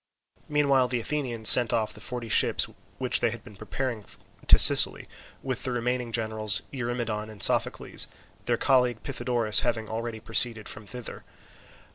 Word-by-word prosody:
Meanwhile 140 -3 +1
the 125 0 -4
Athenians 120 -4 -4
sent 120 -1 +10
off 110 -2 -2
the - - -14
forty 120 -2 -8
ships - - 0 0.3
which 130 -1 -1
they 120 - 0
had 115 -1 -8
been 105 - -16
preparing 120 +2 -6 0.4
to - - +7
Sicily, - - +5 0.4
with 130 -3 -5
the 130 - -5
remaining 125 0 -4
generals 110 -3 -2
Eurymedon 120 -4 -5
and 110 -2 -5
Sophocles; - - +1 0.4
their 120 -1 -1
colleague 125 -4 0
Pythodorus 120 -5 +1
having 110 -2 -3
already 115 0 -6
preceded 115 0 0
them 105 -1 -8
thither. 125 +1 -10
120 Hz, 150 wpm, -25 LUFS, 110-125 Hz, 0.4 s, sent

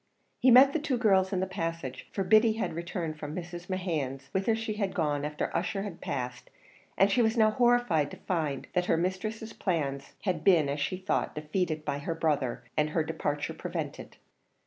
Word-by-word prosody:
He 255 - +5
met 260 +3 +8
the 320 - +1
two 280 -4 -1
girls 195 -5 +3
in 185 -2 0
the - - +1
passage, 165 -8 -4
for 195 - -1
Biddy 220 +3 +5
had 220 - -2
returned 170 -2 -4
from 150 0 -5
Mrs. 175 0 -7
Mehan's, 150 -8 -3
whither 195 +4 +1
she 225 -1 -3
had 200 -2 -2
gone 150 -5 0
after 150 0 -3
Ussher 195 -2 -1
had 195 -5 -7
passed, 125 -2 -4 0.5
and 195 +1 +5
she 245 - +3
was 225 +1 +2
now 215 -1 +5
horrified 240 - +3
to - - -9
find 155 -7 -2
that 180 -1 +1
her 165 - +2
mistress's 215 +6 -3
plans 140 -7 -2
had 180 -6 -1
been, 165 -7 +5
as 145 +1 -2
she 145 +6 -1
thought, 185 0 -1
defeated 155 +1 -2
by 140 - -1
her 165 +3 -3
brother, 145 -6 0
and 150 0 +2
her 160 +1 +1
departure 150 -2 -2
prevented. - - -6
175 Hz, 190 wpm, -29 LUFS, 150-205 Hz, 0.5 s, met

